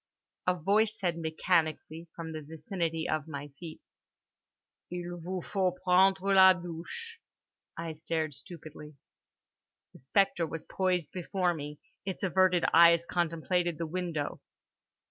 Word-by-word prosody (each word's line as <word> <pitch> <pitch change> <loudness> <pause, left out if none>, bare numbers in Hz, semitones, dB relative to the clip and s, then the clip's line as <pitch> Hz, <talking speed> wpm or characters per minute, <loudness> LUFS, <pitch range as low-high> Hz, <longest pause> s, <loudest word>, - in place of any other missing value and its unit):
A 180 - +4
voice 210 +6 +2
said 175 -3 -1
mechanically 160 0 0
from 165 -1 -6
the 155 -1 -5
vicinity 160 +2 -3
of 155 -1 -1
my 145 -1 -6
feet: 165 -3 -9 1.1
"Il 175 0 -5
vous 180 +1 -4
faut 190 -3 0
prendre 190 +1 +4
la 190 -1 +9
douche"—I 175 - -9
stared 160 -1 -2
stupidly. 150 0 -11 1.0
The - - -15
spectre 170 +4 +1
was 165 0 -6
poised 180 -3 0
before 180 0 0
me; 150 -2 -7 0.2
its 190 0 -5
averted 185 -1 +3
eyes 170 0 +7
contemplated 175 0 0
the 170 - -2
window. 165 -3 -3
170 Hz, 120 wpm, -30 LUFS, 160-185 Hz, 1.1 s, la